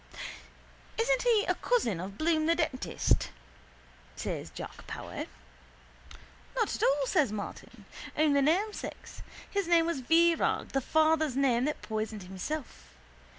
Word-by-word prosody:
—Isn't -, -, +2 dB
he 460 Hz, -4 st, +3 dB
a -, -, +3 dB
cousin 320 Hz, -, +1 dB
of 195 Hz, +3 st, -6 dB
Bloom 315 Hz, -1 st, +2 dB
the 335 Hz, -, +4 dB
dentist? 260 Hz, -, 0 dB, 0.9 s
says -, -, -4 dB
Jack -, -, -9 dB
Power. -, -, -5 dB, 1.3 s
—Not -, -, +1 dB
at -, -, -6 dB
all, 275 Hz, 0 st, +3 dB
says 265 Hz, -3 st, +2 dB
Martin. 205 Hz, -1 st, -7 dB, 0.3 s
Only 290 Hz, -2 st, +4 dB
namesakes. 375 Hz, +9 st, -1 dB, 0.3 s
His 400 Hz, -3 st, -1 dB
name 340 Hz, -1 st, +5 dB
was 335 Hz, -5 st, -1 dB
Virag, 330 Hz, +5 st, +3 dB
the 270 Hz, -, 0 dB
father's 315 Hz, -1 st, +3 dB
name 255 Hz, -3 st, +3 dB
that 300 Hz, -, -2 dB
poisoned 215 Hz, -2 st, -3 dB
himself. 190 Hz, +11 st, -6 dB
310 Hz, 125 wpm, -30 LUFS, 240-335 Hz, 1.3 s, name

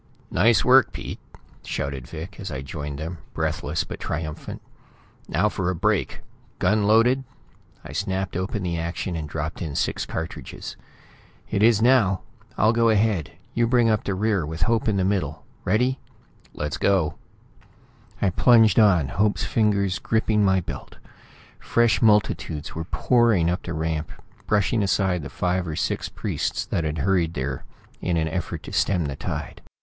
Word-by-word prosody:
"Nice 115 Hz, -3 st, +4 dB
work, 130 Hz, -2 st, +6 dB
Pete!" -, -, -6 dB, 0.4 s
shouted 70 Hz, -3 st, -4 dB
Vic, 80 Hz, +7 st, -8 dB
as 95 Hz, -3 st, -5 dB
I 65 Hz, -1 st, -4 dB
joined 75 Hz, 0 st, -5 dB
them, 80 Hz, +3 st, -5 dB, 0.2 s
breathless 75 Hz, +1 st, -1 dB
but -, -, -8 dB
triumphant. 80 Hz, -1 st, -5 dB, 0.7 s
"Now 105 Hz, -, +2 dB
for 95 Hz, -4 st, -1 dB
a 90 Hz, -, -1 dB
break! 100 Hz, +2 st, 0 dB, 0.4 s
Gun 110 Hz, -1 st, +2 dB
loaded?" 120 Hz, +5 st, +4 dB, 0.6 s
I -, -, -8 dB
snapped 95 Hz, -1 st, -2 dB
open 95 Hz, +3 st, -2 dB
the 85 Hz, -2 st, -1 dB
action 85 Hz, +2 st, -3 dB
and 80 Hz, -2 st, -4 dB
dropped 75 Hz, +1 st, -4 dB
in 75 Hz, -4 st, -4 dB
six -, -, -1 dB
cartridges. 80 Hz, +1 st, -6 dB, 0.8 s
"It 100 Hz, -, +1 dB
is 110 Hz, -1 st, +5 dB
now. 115 Hz, -7 st, +4 dB, 0.4 s
I'll 110 Hz, +2 st, +4 dB
go 115 Hz, 0 st, +3 dB
ahead; 105 Hz, -6 st, +1 dB, 0.2 s
you 120 Hz, -1 st, +2 dB
bring 120 Hz, -2 st, +4 dB
up 110 Hz, -, +1 dB
the 100 Hz, -, -2 dB
rear 105 Hz, -2 st, +1 dB
with 80 Hz, +2 st, -3 dB
Hope 115 Hz, +4 st, +1 dB
in 105 Hz, -3 st, +2 dB
the 95 Hz, -, +2 dB
middle. 95 Hz, 0 st, -1 dB, 0.2 s
Ready?" 125 Hz, +7 st, +2 dB, 0.6 s
"Let's 75 Hz, 0 st, -3 dB
go!" 95 Hz, -6 st, +1 dB, 1.0 s
I 95 Hz, -, +2 dB
plunged 115 Hz, 0 st, +5 dB
on, 90 Hz, -10 st, +5 dB
Hope's 105 Hz, +5 st, +1 dB
fingers 100 Hz, -4 st, +1 dB
gripping 110 Hz, -1 st, +1 dB
my 95 Hz, -1 st, +3 dB
belt. 85 Hz, -, -8 dB, 0.6 s
Fresh 120 Hz, -1 st, +2 dB
multitudes 105 Hz, -8 st, +2 dB
were 80 Hz, +1 st, -4 dB
pouring 110 Hz, -5 st, +3 dB
up 90 Hz, -, -2 dB
the 85 Hz, -, -5 dB
ramp, 80 Hz, -1 st, -2 dB, 0.4 s
brushing 105 Hz, +2 st, +2 dB
aside 95 Hz, -2 st, +1 dB
the 70 Hz, -, -7 dB
five 90 Hz, +4 st, -1 dB
or 80 Hz, -, -3 dB
six -, -, -1 dB
priests -, -, -2 dB
that 85 Hz, -, -1 dB
had 75 Hz, +1 st, -2 dB
hurried 85 Hz, +1 st, +1 dB
there 65 Hz, -1 st, -3 dB, 0.4 s
in 90 Hz, -2 st, 0 dB
an 80 Hz, -1 st, +1 dB
effort 85 Hz, -1 st, -4 dB
to -, -, -9 dB
stem 90 Hz, -5 st, +2 dB
the 70 Hz, -2 st, -3 dB
tide. -, -, -5 dB
95 Hz, 160 wpm, -24 LUFS, 80-110 Hz, 1.0 s, work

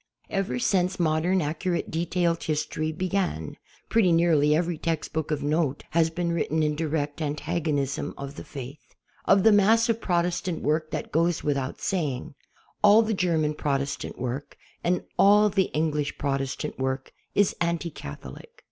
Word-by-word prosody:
Ever 195 Hz, +3 st, -1 dB
since 190 Hz, -7 st, +1 dB
modern 170 Hz, +2 st, +2 dB
accurate 170 Hz, +4 st, -2 dB
detailed 170 Hz, 0 st, 0 dB
history 155 Hz, 0 st, -2 dB
be 180 Hz, +4 st, -3 dB
gan, 180 Hz, -, -2 dB, 0.4 s
|)retty 215 Hz, -6 st, +4 dB
nearly 160 Hz, -3 st, +4 dB
every 170 Hz, 0 st, -1 dB
textbook 160 Hz, -1 st, -2 dB
of 150 Hz, -2 st, -1 dB
note 150 Hz, -1 st, 0 dB
has 165 Hz, 0 st, +3 dB
been 170 Hz, +1 st, -2 dB
written 160 Hz, -1 st, 0 dB
in 150 Hz, 0 st, +1 dB
direct 150 Hz, -1 st, -2 dB
antagonism 150 Hz, -2 st, -2 dB
of 140 Hz, 0 st, -6 dB
the -, -, -8 dB
Faith. 140 Hz, +1 st, -10 dB, 0.3 s
Of 195 Hz, -, +5 dB
the 225 Hz, -, +7 dB
mass 220 Hz, +3 st, +4 dB
of 230 Hz, 0 st, +1 dB
Protestant 175 Hz, 0 st, -1 dB
work 155 Hz, +1 st, 0 dB
that -, -, -4 dB
goes 165 Hz, +2 st, +1 dB
without 140 Hz, -2 st, -1 dB
saying. 155 Hz, -5 st, -2 dB, 0.5 s
.Ml 210 Hz, +2 st, +7 dB
the 220 Hz, -, 0 dB
Ger 180 Hz, -4 st, +1 dB
man 150 Hz, -1 st, +1 dB
Protestant 140 Hz, -2 st, -2 dB
work 125 Hz, +3 st, -5 dB, 0.3 s
and 180 Hz, +1 st, +1 dB, 0.2 s
all 210 Hz, +1 st, +6 dB
the 195 Hz, -1 st, +2 dB
English 150 Hz, -1 st, -1 dB
Protestant 135 Hz, -2 st, -2 dB
work 130 Hz, 0 st, -2 dB, 0.2 s
is 205 Hz, -1 st, +3 dB
anti 170 Hz, 0 st, 0 dB
Catholic. 70 Hz, -, -9 dB
160 Hz, 155 wpm, -26 LUFS, 145-180 Hz, 0.5 s, the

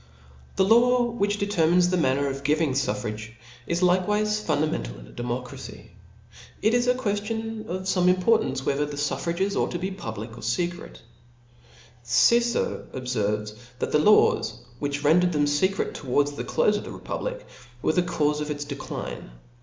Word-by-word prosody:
» 65 Hz, 0 st, -25 dB
The 190 Hz, -, +3 dB
law 245 Hz, +4 st, +5 dB
which 205 Hz, -2 st, 0 dB
determines 180 Hz, -3 st, +2 dB
the -, -, +2 dB
manner 140 Hz, -3 st, +2 dB
of 135 Hz, 0 st, -4 dB
giving 150 Hz, +1 st, +2 dB
fuffrage, 110 Hz, -4 st, -2 dB, 0.3 s
is 170 Hz, +1 st, -1 dB
likewife 210 Hz, +4 st, +2 dB
fundamental 145 Hz, -, -1 dB
in -, -, -12 dB
^ -, -, -16 dB
democracy. 120 Hz, +1 st, -6 dB, 0.7 s
It 220 Hz, +2 st, +2 dB
is 245 Hz, 0 st, +2 dB
a 250 Hz, -, +4 dB
queftion 225 Hz, 0 st, -3 dB
of 185 Hz, +2 st, -4 dB
fomc 185 Hz, -1 st, +1 dB
importance, 180 Hz, -, +2 dB
whether 145 Hz, +1 st, 0 dB
the 145 Hz, -1 st, -7 dB
fufFrages 170 Hz, +7 st, -1 dB
ought -, -, +1 dB
to -, -, -3 dB
be 185 Hz, +3 st, -3 dB
public 110 Hz, -, -6 dB
or 115 Hz, -, -11 dB
fecret, 175 Hz, +10 st, -3 dB, 1.0 s
Cicero 235 Hz, -, +2 dB
ob* 130 Hz, -, -5 dB
0)lib. 125 Hz, -3 st, -1 dB
I. 105 Hz, 0 st, 0 dB
ferves.(*), 105 Hz, 0 st, -9 dB, 0.2 s
that -, -, -3 dB
the 150 Hz, -, +4 dB
laws 210 Hz, +8 st, +4 dB
f -, -, -18 dB
which 145 Hz, 0 st, -3 dB
rendered 175 Hz, +4 st, +4 dB
them 145 Hz, -1 st, +2 dB
■^^' -, -, 0 dB, 0.2 s
feeret 195 Hz, -, -3 dB
towards 145 Hz, +2 st, 0 dB
the 145 Hz, -, -6 dB
clofe 210 Hz, 0 st, +2 dB
of -, -, -9 dB
the -, -, -8 dB
republic, -, -, -5 dB, 0.4 s
were -, -, +2 dB
the 180 Hz, -, +3 dB
caufe 150 Hz, -4 st, 0 dB
of 150 Hz, -, -4 dB
its. 145 Hz, -1 st, -3 dB
decline. 140 Hz, -, -6 dB
160 Hz, 175 wpm, -25 LUFS, 135-200 Hz, 1.0 s, law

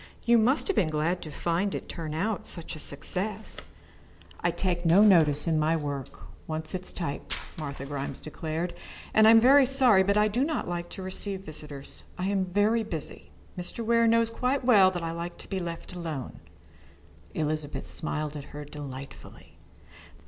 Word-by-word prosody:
You 235 Hz, 0 st, +5 dB
must 255 Hz, +7 st, +2 dB
have 395 Hz, -, 0 dB
been 170 Hz, -, +2 dB
glad 155 Hz, +4 st, -1 dB
to 155 Hz, -, -7 dB
find 175 Hz, +6 st, -1 dB
it -, -, -6 dB
turn 155 Hz, -3 st, -5 dB
out 205 Hz, +5 st, -2 dB
such 170 Hz, -2 st, -1 dB
a -, -, -9 dB
success." 190 Hz, +9 st, -2 dB, 0.8 s
"I 170 Hz, -, +1 dB
take 175 Hz, 0 st, -1 dB
no 175 Hz, +4 st, +6 dB
interest 160 Hz, -8 st, +5 dB
in 160 Hz, -2 st, +2 dB
my 155 Hz, +2 st, +2 dB
work 145 Hz, -3 st, -5 dB, 0.3 s
when 155 Hz, 0 st, -2 dB
once 160 Hz, -, +1 dB
it 185 Hz, -, -2 dB
is 185 Hz, -, -1 dB
typed," 155 Hz, -6 st, -4 dB, 0.2 s
Martha 140 Hz, -3 st, -6 dB
Grimes 140 Hz, -1 st, -4 dB
declared, 160 Hz, +3 st, -4 dB, 0.4 s
"and 220 Hz, 0 st, +6 dB
I -, -, +9 dB
am 225 Hz, 0 st, +8 dB
very 265 Hz, +3 st, +6 dB
sorry 255 Hz, -7 st, +6 dB
but 200 Hz, +2 st, +2 dB
I 210 Hz, 0 st, +4 dB
do 235 Hz, +5 st, 0 dB
not 310 Hz, +2 st, -2 dB
like 175 Hz, 0 st, -4 dB
to 190 Hz, -, -6 dB
receive 190 Hz, +1 st, -1 dB
visitors. 150 Hz, -5 st, -5 dB
I 180 Hz, -, -2 dB
am 195 Hz, -2 st, +1 dB
very 205 Hz, +5 st, +2 dB
busy. 165 Hz, -8 st, -4 dB, 0.3 s
Mr. 180 Hz, +6 st, -4 dB
Ware 230 Hz, 0 st, +4 dB
knows 230 Hz, 0 st, +3 dB
quite 255 Hz, +3 st, -1 dB
well 205 Hz, -7 st, +7 dB
that 175 Hz, -2 st, -4 dB
I 165 Hz, -, -2 dB
like 170 Hz, +1 st, -6 dB
to -, -, -10 dB
be 195 Hz, -, -3 dB
left 170 Hz, 0 st, -6 dB
alone." 160 Hz, -7 st, -6 dB, 1.0 s
Elizabeth 155 Hz, -1 st, -2 dB
smiled 155 Hz, -1 st, -3 dB
at 145 Hz, -1 st, -6 dB
her 150 Hz, 0 st, -6 dB
delightfully. 140 Hz, -2 st, -10 dB
175 Hz, 185 wpm, -27 LUFS, 155-210 Hz, 1.0 s, I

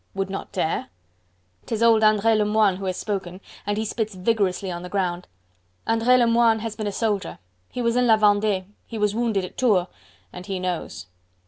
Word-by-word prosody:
"Would 195 Hz, 0 st, -2 dB
not 195 Hz, -, -6 dB
dare?..." 180 Hz, -5 st, -1 dB, 0.8 s
'Tis 225 Hz, 0 st, -1 dB
old 225 Hz, -1 st, +5 dB
Andre 215 Hz, +1 st, +4 dB
Lemoine 210 Hz, -2 st, +2 dB
who 195 Hz, -, -6 dB
has 185 Hz, -1 st, -2 dB
spoken, 190 Hz, -3 st, -4 dB, 0.3 s
and 205 Hz, 0 st, 0 dB
he 220 Hz, -, -1 dB
spits 220 Hz, -1 st, -3 dB
vigorously 195 Hz, -1 st, 0 dB
on 175 Hz, 0 st, -5 dB
the 180 Hz, -, -8 dB
ground. 180 Hz, -2 st, -2 dB, 0.6 s
Andre 230 Hz, +3 st, +3 dB
Lemoine 235 Hz, -1 st, +4 dB
has 225 Hz, -1 st, -4 dB
been 215 Hz, -, -4 dB
a -, -, -1 dB
soldier; 205 Hz, -2 st, -2 dB, 0.3 s
he 245 Hz, -, -4 dB
was 235 Hz, 0 st, +1 dB
in 250 Hz, 0 st, +3 dB
La 220 Hz, -1 st, +6 dB
Vendee. 205 Hz, -2 st, +2 dB, 0.2 s
He 230 Hz, -, -6 dB
was 210 Hz, -1 st, +1 dB
wounded 220 Hz, -4 st, 0 dB
at -, -, -11 dB
Tours... 210 Hz, -8 st, +3 dB, 0.5 s
and 180 Hz, +2 st, -9 dB
he 195 Hz, -2 st, -3 dB
knows! 180 Hz, -, -4 dB
210 Hz, 190 wpm, -23 LUFS, 190-225 Hz, 0.8 s, La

